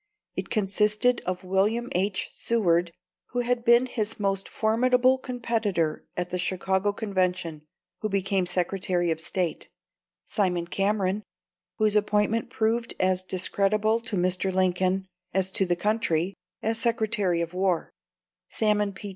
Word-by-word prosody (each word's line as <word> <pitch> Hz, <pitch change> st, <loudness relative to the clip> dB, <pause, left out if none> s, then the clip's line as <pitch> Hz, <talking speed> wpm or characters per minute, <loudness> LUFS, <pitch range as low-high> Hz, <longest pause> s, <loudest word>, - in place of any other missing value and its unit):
It -, -, -4 dB
consisted 215 Hz, +4 st, +2 dB
of 185 Hz, +1 st, -2 dB
William 205 Hz, +6 st, +1 dB
H. 190 Hz, +2 st, 0 dB
Seward 175 Hz, -7 st, +1 dB, 0.4 s
who 245 Hz, -, -1 dB
had 245 Hz, 0 st, 0 dB
been 235 Hz, +1 st, +5 dB
his 225 Hz, -4 st, -3 dB
most 195 Hz, -1 st, -1 dB
formidable 250 Hz, +3 st, +3 dB
competitor 225 Hz, -10 st, -1 dB
at 180 Hz, 0 st, -2 dB
the 180 Hz, -, -1 dB
Chicago 190 Hz, +2 st, 0 dB
Convention 185 Hz, -6 st, -1 dB, 0.4 s
who 215 Hz, -, -2 dB
became 195 Hz, -1 st, 0 dB
Secretary 180 Hz, -1 st, 0 dB
of 160 Hz, 0 st, -2 dB
State; 175 Hz, -1 st, -2 dB, 0.6 s
Simon 180 Hz, -5 st, 0 dB
Cameron 195 Hz, +2 st, 0 dB, 0.6 s
whose 215 Hz, -1 st, +2 dB
appointment 210 Hz, +2 st, +1 dB
proved 230 Hz, +1 st, 0 dB
as 185 Hz, 0 st, +2 dB
discreditable 205 Hz, +4 st, +1 dB
to 230 Hz, -2 st, -3 dB
Mr. 185 Hz, +1 st, +1 dB
Lincoln 185 Hz, +1 st, +1 dB, 0.3 s
as 190 Hz, -1 st, +1 dB
to 190 Hz, 0 st, +1 dB
the 175 Hz, -, +2 dB
country 195 Hz, -3 st, 0 dB, 0.3 s
as 225 Hz, +1 st, 0 dB
Secretary 215 Hz, -6 st, +1 dB
of 170 Hz, +1 st, -3 dB
War; 185 Hz, -2 st, 0 dB, 0.6 s
Salmon 210 Hz, -2 st, +1 dB
P. 200 Hz, +2 st, -7 dB
195 Hz, 130 wpm, -26 LUFS, 185-220 Hz, 0.6 s, been